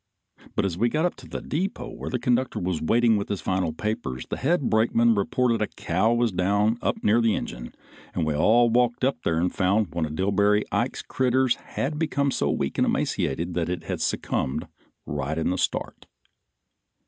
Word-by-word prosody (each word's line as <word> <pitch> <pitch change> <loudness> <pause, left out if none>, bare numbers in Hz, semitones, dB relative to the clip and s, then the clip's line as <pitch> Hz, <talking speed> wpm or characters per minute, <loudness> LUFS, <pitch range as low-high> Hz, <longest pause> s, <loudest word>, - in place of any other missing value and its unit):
But 110 - +1
as 90 -2 -2
we 120 +2 +3
got 155 +6 +1
up 180 - 0
to - - -13
the - - -6
depot 185 +7 -3
where - - -6
the 125 - -1
conductor 125 +1 0
was 90 -2 -2
waiting 115 +6 +3
with 100 - -4
his 100 - -2
final 95 -1 -1
papers, 95 - -3
the - - -4
head 145 0 +1
brakeman 115 +1 +3
reported 115 +3 +1
a 105 - +1
cow 95 +7 0
was 120 -1 +2
down 100 +5 +1
up - - -1
near 110 +3 +4
the 115 -2 +3
engine, - - -6 0.4
and - - 0
we 75 - 0
all 115 +9 +4
walked 120 +1 +2
up 130 -2 +1
there 80 - +1
and 90 +1 0
found 100 +4 +2
that 80 - -17
one 80 -2 0
of 75 - -7
Dillbery 100 +3 +2
Ike's - - -1
critters 130 -1 +2 0.2
had 150 +3 -1
become 140 -3 +1
so - - 0
weak 70 - -1
and - - +3
emaciated 85 +6 -1
that 85 -1 -1
it 90 -2 -3
had - - -4
succumbed 65 - -1 0.4
right 75 +2 -3
in 80 +2 0
the 95 - -1
start. - - -2
105 Hz, 200 wpm, -25 LUFS, 90-120 Hz, 0.4 s, near